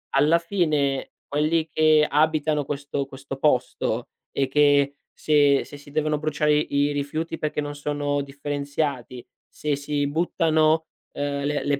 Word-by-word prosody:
alla 150 +5 +4
fine, 155 -7 0 0.2
quelli 155 +2 +1
che 155 0 +4
abitano 155 -1 +2
questo 140 0 -3
questo 135 0 -8
posto 125 -3 0 0.3
e 135 - +1
che 145 0 +3 0.2
se 145 -2 +3
se 145 - -11
si 145 0 -15
devono 155 0 0
bruciare 150 0 +1
i 145 -1 +1
rifiuti 150 +3 -3
perché 150 0 -2
non 145 0 -5
sono 145 0 -1
differenziati, 140 -2 -4 0.2
se 150 -1 -2
si 145 0 -1
buttano, 160 0 +2 0.3
uhm, 140 0 -2
le 145 0 -1
le 145 -1 0
145 Hz, 135 wpm, -24 LUFS, 140-155 Hz, 0.3 s, alla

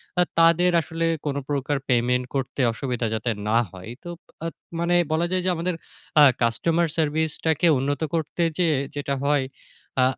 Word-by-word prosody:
তা 180 - +3 0.2
তাদের 170 +2 +5
আসলে 165 +2 -3 0.2
কোন 145 -2 -1
প্রকার 140 0 0
payment 125 +1 +2
করতে 135 0 -2
অসুবিধা 120 -1 -2
যাতে 110 +2 -1 0.2
না 110 +2 +3
হয়। 95 +1 -11
এই - - -8
তো 175 - -7 0.4
আ - - 0 0.3
মানে 170 +1 +1 0.2
বলা 160 +2 +2
যায় 185 -1 +1
যে, 185 - +3
আমাদের 170 +2 -2 0.5
আ - - +10 0.2
customer 165 +9 +2
service 155 0 +1
টাকে 160 +2 +3
উন্নত 140 +2 -1
করতে 165 +1 -1
যেয়ে 165 -5 +2 0.2
যেটা 140 -1 -2
হয় 145 -2 +2 0.6
আ - - +5
150 Hz, 170 wpm, -24 LUFS, 130-165 Hz, 0.6 s, আ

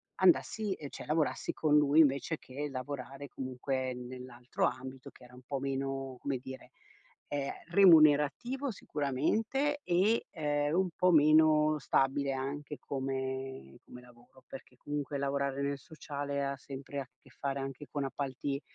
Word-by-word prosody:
andassi 190 +3 +3
ehm, 145 -5 -8
cioè - - -8
lavorassi 155 0 0
con 150 -1 +3
lui 150 +1 +4
invece 140 +1 +2
che 140 +3 -5
lavorare 135 +1 -6
comunque 130 0 -3
nell'altro 125 0 -4
ambito 130 0 -4
che - - -18
era 125 - -17
un 125 - -14
po' 140 +1 -3
meno, 135 -1 -3
come 140 -2 -2
dire, 130 +1 -10 0.6
ehm, 140 -1 -2 0.2
remunerativo, 175 - +5
sicuramente 215 - 0
e, 190 +6 +2
ehm, 145 -2 0
un 185 0 +2
po' 180 0 +4
meno 155 0 +5
stabile 135 0 +1
anche 145 +2 -4
come 130 - -4
come 125 - -11
lavoro. 125 +1 -19
Perché 130 -1 -11
comunque 145 +1 -3
lavorare 140 0 -1
nel 140 0 -1
sociale 145 -2 -4
ha 140 0 -2
sempre 135 +1 -7
a 135 - -5
che - - -19
fare 140 0 -3
anche 135 +1 -6
con 145 - -2
appalti, 140 +1 -3
140 Hz, 145 wpm, -32 LUFS, 130-150 Hz, 0.6 s, remunerativo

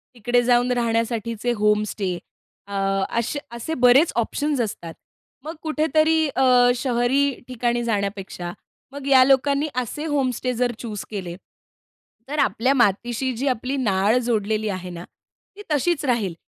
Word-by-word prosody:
तिकडे 240 +1 +1
जाऊन 245 +1 +3
राहण्यासाठीचे 230 -1 -1
होमस्टे 210 -3 0 0.5
अ, 200 - -9 0.4
अशे 235 +5 -2
असे 235 +7 -5
बरेच 270 +7 +6
ऑप्शन्स 275 +4 0
असतात. 170 -6 -5 0.5
मग 320 +2 -6
कुठेतरी 315 0 +2
अ, 250 -2 +5
शहरी 255 +3 +1 0.2
ठिकाणी 240 -1 -1
जाण्यापेक्षा 200 -5 -3 0.4
मग 280 0 -8
या 265 -2 +7
लोकांनी 280 +2 +2
असे 255 +5 -3
होमस्टे 260 -4 -1
जर 245 0 0
चूज 215 -4 -5
केले, 180 -5 -5 0.9
तर 300 +1 -2
आपल्या 245 +6 +2
मातीशी 240 +2 +1
जी 275 +3 -2
आपली 255 +1 -1
नाळ 210 -1 +2
जोडलेली 215 -1 0
आहे 185 -2 -5
ना 175 -1 -8 0.5
ती 415 - -10
तशीच 300 +2 +1
राहील. 225 -8 0
245 Hz, 130 wpm, -22 LUFS, 215-270 Hz, 0.9 s, या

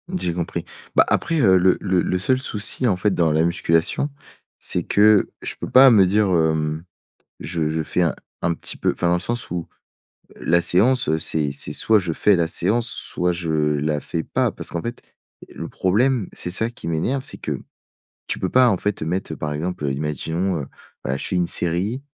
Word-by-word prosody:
J'ai 85 - -1
compris. 85 -1 -4 0.3
Bah, - - +6
après, 165 -1 0
heu, 95 -8 +5
le 90 0 +3
le 95 -2 +1
le 90 - -1
seul 130 +7 +2
souci 120 0 -1
en 95 - +2
fait 100 +2 +1
dans 80 -2 +2
la 80 +1 +2
musculation, 85 - +1 0.5
c'est - - +1
que 105 0 +4
je - - -3
peux - - -6
pas 130 +1 +8
me 100 -4 +6
dire 105 +2 +2
hem, 80 -2 +1 0.6
je 80 -3 -2
je 80 0 -1
fais 90 - -1
un 85 - +1 0.3
un 85 - +1
petit - - -5
peu - - +1
enfin 85 - -2
dans 85 - +3
le - - -1
sens 120 +3 -3
où 85 -2 -3 0.7
la 85 +1 +2
séance 95 - +2
c'est 75 -3 -1
c'est 70 - -5
soit 110 -1 +3
je 85 -3 -3
fais 100 +5 +3
la 85 -1 +1
séance 105 +8 0
soit 90 0 -1
je 85 -1 -4
la 75 0 0
fais 80 +1 -3
pas, - - 0
parce - - -9
qu'en 85 - -3
fait 120 +1 -5 0.5
et - - -17
le - - -6
problème 115 +4 +1
c'est 90 - -6
ça 110 +6 -1
qui 100 - -8
m'énerve, 115 +12 -1
c'est - - -6
que, - - -4 0.7
tu - - -1
peux 95 - -1
pas 125 +2 +5
en 95 - +1
fait 105 -2 -2
mettre 85 0 -3
par 75 -1 -4
exemple, 85 +1 -3
heu, 70 - 0
imaginons, 80 +5 -2
heu, 70 - -6 0.4
voilà, 65 +1 -2
je - - -5
fais - - -2
une 90 -1 +1
série, 95 +12 -1
90 Hz, 210 wpm, -22 LUFS, 80-105 Hz, 0.7 s, pas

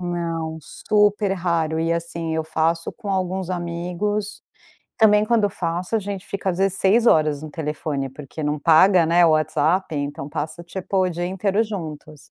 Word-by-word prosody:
Não, 165 -2 -3
super 205 +4 +1
raro 170 -3 -1
e 165 +1 +1
assim 170 -1 -3
eu 160 - 0
faço 160 +1 0
com 205 - -9
alguns 185 -1 -2
amigos, 180 +4 -3 0.5
também 210 -1 +5
quando 230 -2 +2
eu 200 - +1
faço 175 +3 -3
a - - +2
gente 200 -2 -6
fica 195 -1 -4
às 175 - -4
vezes 195 0 +1
6 225 +5 +3
horas 155 -7 +3
no 155 - -7
telefone 150 -3 -3
porque 145 +3 -9
não 150 0 -1
paga, 170 +4 +5
né, 170 +1 +5
o - - +4
WhatsApp 155 +3 +1
então 145 -1 -4
passa 155 +3 -5
tipo 190 +2 -3
o 185 -1 +3
dia 175 +1 -3
inteiro 195 +3 0
juntos. 155 -8 -7
170 Hz, 175 wpm, -22 LUFS, 160-195 Hz, 0.5 s, também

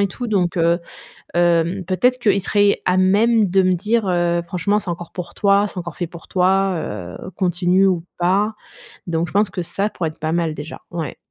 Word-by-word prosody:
et 200 - +2
tout. 245 +5 -5
Donc 185 -6 0
heu, 170 +1 +2 0.5
hem, 175 +2 +2
peut-être 245 +8 +1
qu'ils 205 -4 +2
seraient 205 +1 +2
à 180 - +3
même 205 +3 +3
de 190 +1 +4
me 185 0 +3
dire 210 +3 0
heu: 175 -1 +1
«Franchement 185 +4 0
c'est 205 - -6
encore 175 0 -6
pour 180 -1 -7
toi, 200 0 +3
c'est - - -15
encore 170 -3 -6
fait 175 - -2
pour 170 0 -13
toi, 190 +1 +2
heu, 95 - -6
continue 180 +1 +2
ou 175 -3 +1
pas». 200 +5 +1 0.5
Donc 170 0 -1
je - - -11
pense 205 0 +3
que 185 - -4
ça 195 +4 -2
pourrait 170 -5 -3
être 155 - -11
pas 155 0 -2
mal 165 -2 0
déjà. 150 +2 -8
Ouais. 165 -5 -4
180 Hz, 205 wpm, -20 LUFS, 170-200 Hz, 0.5 s, de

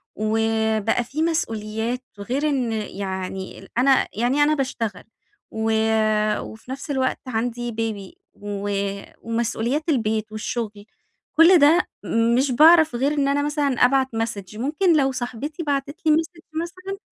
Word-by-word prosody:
وبقى 220 +1 +1
في 290 +6 -4
مسؤوليات، 225 -6 -1 0.2
وغير 265 +9 -1
إن 255 -5 0
يعني 190 -2 -5
ال - - -13
أنا 265 +1 +4
يعني 250 +6 +2
أنا 305 +1 +3
باشتغل، 230 -8 -3 0.5
و 220 0 -1 0.7
وفي 220 +4 -10
نفْس 275 +3 -5
الوقت 260 -2 0
عندي 240 0 -2
baby، 220 - -5
و 205 0 -5 0.5
ومسؤوليات 235 +5 -1
البيت 220 -5 0
والشغل. 215 -1 -4 0.5
كل 340 +1 +8
ده 315 +5 +5 0.5
مش 265 0 +2
باعرف 315 0 +6
غير 275 +4 +1
إن 285 -2 +1
أنا 280 +1 +1
مثلًا 295 -1 0 0.2
أبعت 265 +1 +3
message. 215 -3 -4
ممكن 310 +6 +2
لو 270 -2 +2
صاحبتي 255 +6 -5
بعتت 285 0 -2
لي 310 - +6
message 325 +1 -2 0.2
مثلًا 370 +3 -7
245 Hz, 135 wpm, -23 LUFS, 220-290 Hz, 0.7 s, كل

